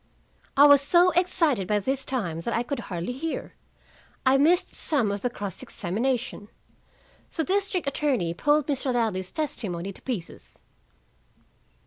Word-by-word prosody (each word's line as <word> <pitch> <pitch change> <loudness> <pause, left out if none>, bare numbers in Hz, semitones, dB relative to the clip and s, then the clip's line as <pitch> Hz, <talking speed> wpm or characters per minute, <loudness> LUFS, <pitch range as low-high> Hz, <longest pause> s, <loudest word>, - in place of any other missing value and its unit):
I 285 - +9
was 285 -1 +8
so 345 +5 +5
excited 330 - +2
by 210 - +2
this 265 +6 -1
time 190 -12 -2
that 230 +8 -2
I 235 - +1
could 275 +3 -4
hardly 175 +5 -4
hear. 315 +5 -5 0.7
I 260 +1 +5
missed 345 +6 +3
some 250 -10 +1
of 200 0 -3
the 245 - 0
cross 200 -6 -6
examination. 225 +3 -3 0.9
The 320 - 0
district 390 0 0
attorney 265 - 0
pulled 295 - +2
Mr. 275 -2 -1
Ladley's 215 -6 -1
testimony 195 - -3
to - - -14
pieces. 220 -10 -7
255 Hz, 140 wpm, -26 LUFS, 200-295 Hz, 0.9 s, I